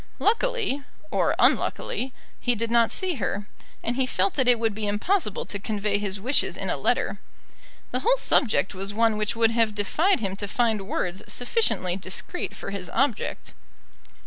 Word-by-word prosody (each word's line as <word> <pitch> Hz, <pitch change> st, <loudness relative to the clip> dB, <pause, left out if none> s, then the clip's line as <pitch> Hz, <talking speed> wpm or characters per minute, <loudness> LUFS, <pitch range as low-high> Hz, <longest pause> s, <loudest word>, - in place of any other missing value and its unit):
Luckily, 450 Hz, -, +1 dB, 0.3 s
or -, -, +2 dB
unluckily, 430 Hz, -, +2 dB, 0.3 s
he 245 Hz, -1 st, +1 dB
did 230 Hz, +1 st, -2 dB
not 235 Hz, -1 st, +4 dB
see 365 Hz, -5 st, 0 dB
her, 205 Hz, +2 st, -2 dB, 0.4 s
and 235 Hz, -, -1 dB
he 260 Hz, -1 st, +1 dB
felt 195 Hz, -4 st, +1 dB
that 260 Hz, -3 st, +1 dB
it 245 Hz, -1 st, +6 dB
would 225 Hz, -1 st, 0 dB
be 210 Hz, 0 st, -3 dB
impossible 210 Hz, -, 0 dB
to 205 Hz, -, -4 dB
convey 205 Hz, 0 st, -1 dB
his 200 Hz, -1 st, -2 dB
wishes 255 Hz, +8 st, +1 dB
in -, -, -1 dB
a -, -, 0 dB
letter. -, -, 0 dB, 0.7 s
The -, -, 0 dB
whole -, -, +3 dB
subject 225 Hz, -, +2 dB
was 195 Hz, +2 st, -4 dB
one 225 Hz, -1 st, +3 dB
which 215 Hz, +1 st, -1 dB
would 230 Hz, -1 st, +3 dB
have 225 Hz, -2 st, +1 dB
defied 315 Hz, -, +2 dB
him 195 Hz, -3 st, -2 dB
to 205 Hz, -, -3 dB
find 220 Hz, -2 st, 0 dB
words 180 Hz, -1 st, -2 dB
sufficiently 245 Hz, -, +1 dB
discreet 195 Hz, -, -4 dB
for -, -, -6 dB
his 195 Hz, -3 st, -4 dB
object. 260 Hz, -3 st, -1 dB
225 Hz, 170 wpm, -25 LUFS, 205-265 Hz, 0.7 s, it